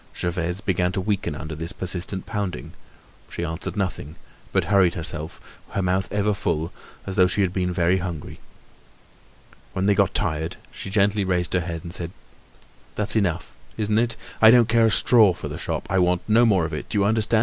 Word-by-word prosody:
Gervaise 85 +2 0
began 90 -3 0
to - - -1
weaken 100 0 -1
under 80 +1 -6
this 80 +2 -4
persistent 90 +1 -4
pounding. 100 - -4 0.6
She - - -5
answered 85 +4 -5
nothing, 95 -6 -3 0.4
but - - +2
hurried 95 -3 +3
herself, 80 -2 -4 0.3
her 100 - 0
mouth 95 +1 0
ever 105 +1 +1
full, 85 -5 -2 0.3
as 95 - -5
though 90 - +6
she 95 +3 0
had 95 -2 +1
been 90 -1 0
very 90 +1 +2
hungry. 90 -5 -6 1.3
When 95 - -1
they 100 - +4
got - - +2
tired, 80 +1 -1 0.2
she - - -7
gently 100 +1 +2
raised 90 -2 0
her 95 - +3
head 85 -2 -5
and 85 - -8
said: 85 -2 -4 0.9
"That's 105 +1 +1
enough, 95 -7 0 0.2
isn't 105 0 +1
it? 115 -1 0 0.3
I 110 - +9
don't 120 -1 +6
care 115 0 +4
a - - +2
straw 110 -3 +5
for - - -6
the - - -6
shop! - - -3
I 95 - +1
want 90 0 +2
no 115 +2 +5
more 95 -6 +3
of 80 - -5
it. 75 - -5
Do - - -2
you 100 - +3
understand? 110 +1 +2
95 Hz, 195 wpm, -23 LUFS, 85-105 Hz, 1.3 s, I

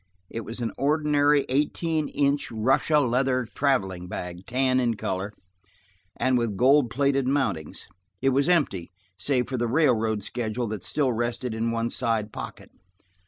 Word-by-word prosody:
It 115 - -4
was 115 +3 -6
an 115 - -1
ordinary 145 0 +3
eighteen 150 +3 0
inch 140 0 0
Russia 135 +7 +2
leather 130 -1 +1
traveling 95 -11 0
bag, 90 +1 -6
tan 130 +1 +2
in 120 -2 +1
color, 95 0 -3 0.9
and 130 0 +2
with 115 -4 -2
gold 130 +2 +5
plated 140 0 +1
mountings. 115 - -1 0.3
It 135 - +2
was 140 +4 +2
empty, 140 - +1 0.3
save 125 +5 0
for 130 - -3
the 120 0 0
railroad 115 -6 +2
schedule 120 +1 -3
that 105 -3 -4
still 135 +4 0
rested 120 +1 -2
in 115 +1 -1
one 115 0 -1
side 115 -4 -1
pocket. - - -8
125 Hz, 150 wpm, -26 LUFS, 110-140 Hz, 0.9 s, gold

